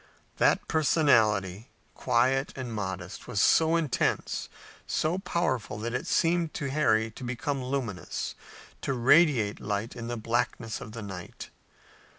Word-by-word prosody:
That - - +3
personality, 115 - +2 0.2
quiet 130 +2 +1
and 125 -3 -5
modest, 95 -3 -5
was 120 -5 -2
so 160 - +4
intense, 160 -6 0 0.4
so 165 +4 0
powerful 165 - -1
that 115 +3 -4
it - - -3
seemed 170 -1 +1
to 140 -2 -3
Harry 110 -7 +2
to 130 - -11
become 130 +3 -2
luminous, 125 -8 -3 0.5
to 135 - -1
radiate 125 -4 +4
light 105 +3 -3
in 115 -1 -6
the 120 0 -3
blackness 115 0 -2
of 110 - -9
the 115 -2 -6
night. 95 -3 -8
120 Hz, 135 wpm, -28 LUFS, 110-140 Hz, 0.5 s, so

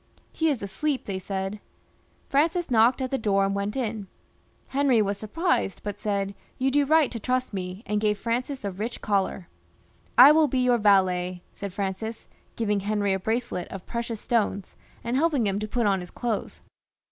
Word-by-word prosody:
" - - -37
He 320 - +4
is 265 -8 -1
asleep," 260 +9 -2
they 190 -2 -3
said. 195 +2 -4 0.7
Francis 325 +3 +1
knocked 240 +3 +4
at 255 - -3
the 270 - 0
door 195 -2 +2
and 195 - 0
went 200 +1 -2
in. 220 -6 -3 0.6
Henry 270 -3 +3
was 205 -1 +1
surprised, 215 - -1
but 205 -1 -5
said, 200 -1 -1 0.2
"You 265 +1 +1
do 290 +1 +3
right 315 -2 +4
to 230 - -5
trust 255 +1 -1
me," 185 +2 -5
and 210 +1 -1
gave 210 -1 +2
Francis 245 +3 -2
a 200 - -1
rich 215 +6 -5
coUar. 195 -3 0 0.7
".I 260 +4 +11
will 310 0 +5
be 260 - -1
your 250 -1 +3
valet," 185 -3 +2
said 200 -1 -6
Francis, 200 +3 -4 0.3
giving 210 -3 0
Henry 205 0 0
a 190 - -1
bracelet 220 -3 -2
of 195 -2 -8
precious 235 -2 -4
stones, 205 -5 -1 0.3
and 235 +2 -1
helping 290 -6 +2
him 200 0 0
to 215 - -3
put 235 +1 0
on 195 -2 +2
his 180 -1 -8
clothes. 235 -4 -4
215 Hz, 185 wpm, -26 LUFS, 195-255 Hz, 0.7 s, I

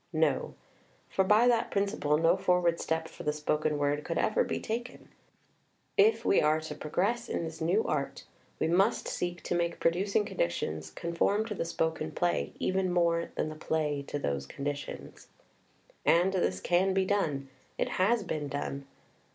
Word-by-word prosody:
No, 155 -3 +1 0.5
for 190 - +2
by 210 +5 +5
that 235 -2 +3
principle 200 -7 +1
no 165 +1 +4
forward 175 -2 +2
step 160 0 -1
for - - -11
the 150 - 0
spoken 150 0 0
word 145 +1 0
could 165 - -3
ever 215 - +2
be - - -2
taken. 240 +3 -5 0.6
// 430 +2 +1
we 395 - +4
are 155 +1 +3
to 155 -1 -6
progress 200 +11 -1
in - - -1
this 160 0 -6
new 180 +7 +2
art, 140 -2 -2 0.4
we - - +1
must 190 +6 +2
seek 175 0 -3
to - - -2
make 170 -1 0
producing 195 +5 +1
conditions 80 - -2
con 170 - -5
form 205 +5 +2
to 220 - -4
the 180 - -3
spoken 160 -1 -1
play, 175 -1 0
even 185 -1 0
more 170 -1 +2
than 155 - -1
the 155 - -7
play 155 -2 -1
to - - -3
those 70 - -2
conditions. 145 - -6 0.8
And 180 +3 +4
this 185 - 0
can 185 +2 +2
be 190 -1 +3
done; 150 -9 0 0.3
it - - 0
has 215 +3 +3
been 155 -5 -3
done. 140 -1 -4
170 Hz, 170 wpm, -30 LUFS, 150-195 Hz, 0.8 s, by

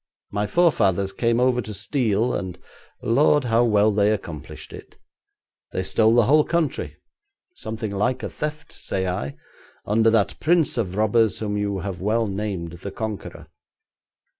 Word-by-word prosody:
My 105 +1 -1
forefathers 100 - +2
came 115 +3 +1
over 125 -1 +2
to 105 -1 -7
steal, 110 +2 0
and, 90 -2 -4 0.5
lord! 145 +5 +3
how 115 -1 +3
well 105 -2 +4
they 100 0 +3
accomplished 85 -8 -6
it. - - -12 0.8
They - - -1
stole 110 +1 +3
the 120 - +6
whole 150 +4 +5
country 170 -2 -2 0.6
something 110 - -5
like 105 +6 -1
a - - -3
theft, 150 0 -5
say 95 -1 -3
I 70 -6 -3 0.5
under 110 +2 +3
that 110 -3 +1
prince 165 -1 +2
of 95 -6 -2
robbers 110 -1 +2
whom 105 -2 -3
you 100 -2 -1
have 95 -1 -5
well 110 +3 +1
named 95 -4 -3
the 100 - -6
Conqueror. 110 0 -6
110 Hz, 150 wpm, -23 LUFS, 100-120 Hz, 0.8 s, the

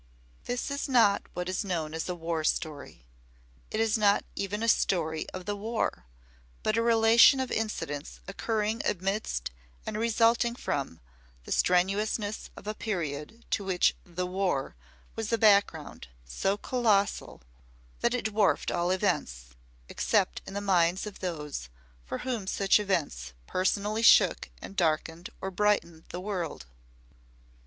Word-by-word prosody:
This 245 +3 -3
is 280 +1 -3
not 230 -6 +4
what 180 0 -3
is 185 +3 -1
known 165 -5 -3
as 160 +2 -4
a 180 - -2
"war 165 -1 -2
story." 145 - -3 0.6
It - - -3
is 225 0 +2
not 205 -1 +3
even 205 +2 -3
a - - 0
story 160 -7 +1
of 185 -1 -8
the 205 - -2
War, 215 - -2 0.6
but 215 - +1
a 230 - +2
relation 230 +3 +6
of 260 - -2
incidents 155 -10 -3
occurring 215 +2 -1
amidst 195 - -2 0.3
and - - -4
resulting 230 +1 +2
from 140 - -3 0.4
the - - -10
strenuousness 205 +4 +1
of - - -11
a 215 - -2
period 175 0 -4
to 200 - 0
which 190 -2 +2
"the 180 +1 -4
War" 180 - -1 0.4
was 225 -1 -3
a 230 - +3
background 200 - +2 0.2
so 195 - -1
colossal 210 - 0 0.6
that 235 +1 +1
it 250 - -3
dwarfed 215 -2 +2
all 175 0 0
events, - - -1 0.4
except - - 0
in 195 - -7
the 200 - -2
minds 185 -2 +2
of 210 -2 -8
those 150 - -5 0.4
for - - -3
whom 235 -7 -2
such 195 +1 +3
events 145 - -2
personally 205 - 0
shook 230 - +5
and 195 - -8
darkened 165 0 0
or 190 - -3
brightened 185 -5 0
the 175 - -5
world. 180 - -4
195 Hz, 145 wpm, -29 LUFS, 165-220 Hz, 0.6 s, relation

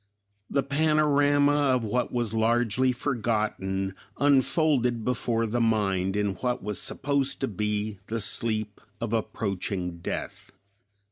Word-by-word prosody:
The 140 - +1
panorama 145 -1 +3
of 130 -4 +2
what 120 +3 -1
was 120 -3 -1
largely 120 +2 +2
forgotten 110 -7 -1 0.2
unfolded 135 -4 +2
before 120 -2 0
the 120 +2 -1
mind 100 -4 +1
in 105 -1 0
what 125 +4 -2
was 105 0 -1
supposed 140 -1 0
to 135 - +1
be 105 -1 -2
the 115 +1 -2
sleep 110 0 0 0.2
of 115 -1 -3
approaching 100 -5 -2
death. 85 - -6
115 Hz, 120 wpm, -27 LUFS, 105-135 Hz, 0.2 s, panorama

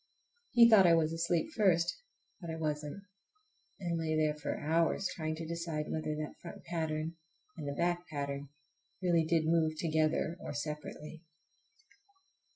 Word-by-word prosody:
He 235 -1 +7
thought 210 -5 +7
I 170 - +7
was 160 -1 +2
asleep 170 - 0
first, 175 -5 +3 0.4
but 170 - -7
I 160 - -3
wasn't,—I 180 - -6
lay 160 -1 0
there 155 -1 +2
for 150 -1 -4
hours 165 +5 +1
trying 155 -1 -2
to 165 +1 -6
decide 165 -2 -3
whether 155 -1 -2
that 150 0 -6
front 170 - -9
pattern 160 -1 -2 0.4
and 155 -4 -6
the 140 - -2
back 175 +2 0
pattern 140 -2 -4 0.5
really 170 -3 +3
did 160 -1 +2
move 160 -1 +3
together 160 +1 +1
or 145 - -6
separately. 150 +1 -6
160 Hz, 145 wpm, -33 LUFS, 155-170 Hz, 0.5 s, He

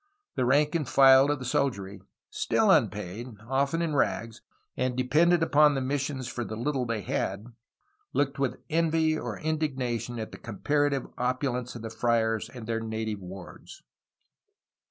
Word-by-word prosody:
The 125 - 0
rank 145 +4 +3
and 155 -6 -1
file 135 0 +7
of 145 - +1
the 130 - -7
soldiery, 100 -7 -1 0.3
still - - +2
unpaid, 110 +7 0
often 140 +6 +1
in 160 -2 -1
rags, 115 -5 -1 0.3
and 130 -1 -1
dependent 165 +7 +3
upon 150 -2 +5
the - - 0
missions 135 -1 -2
for 120 - -4
the 110 - -6
little 125 +2 -1
they 115 -2 -2
had, 100 +1 -2 0.7
looked 140 -1 0
with 135 -2 0
envy 160 -1 +2
or 120 -7 -5
indigna 145 -6 -1
tion 120 -1 -6
at 110 -1 -5
the - - -10
comparative 140 +5 0
opulence 125 -1 -1
of 115 - -8
the 115 - -5
friars 115 -1 0
and 120 -3 -9
their 115 0 -1
native 110 -1 -3
wards. 95 -1 -11
130 Hz, 155 wpm, -28 LUFS, 115-145 Hz, 0.7 s, file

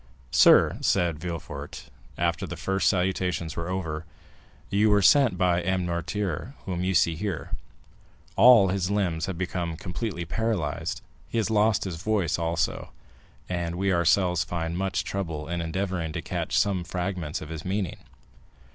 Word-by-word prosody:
"Sir," - - +6
said 85 -5 +1
Villefort, 85 -1 -7 0.3
after 85 -1 0
the - - -6
first 95 -1 +1
salutations 90 -3 -1
were 85 +1 -4
over, 80 -4 -3 0.7
"you 105 +2 +3
were 105 -1 +4
sent 135 0 +6
for - - -7
by 90 -1 +2
M. 95 +1 0
Noirtier, 85 - -3
whom 90 -2 -2
you 95 0 0
see 80 0 +3
here. 85 -5 -4 0.8
All 110 -3 +7
his 95 -1 -1
limbs 90 -5 0
have 95 -3 -4
become 90 -2 -3
completely 90 -1 -4
paralysed, 100 -6 -2 0.3
he - - -3
has 110 -1 0
lost 105 0 +3
his 90 -4 -4
voice 100 -6 0
also, 85 0 -1 0.6
and 85 -2 -2
we 95 +1 +1
ourselves 90 0 +3
find 85 -1 -3
much 95 +1 -1
trouble 80 -6 -4
in 85 0 -2
endeavoring 85 -1 -2
to - - -3
catch - - -2
some 95 -3 +2
fragments 90 -3 -3
of 75 - -9
his 80 -1 -6
meaning." 95 -2 -2
90 Hz, 155 wpm, -26 LUFS, 85-95 Hz, 0.8 s, All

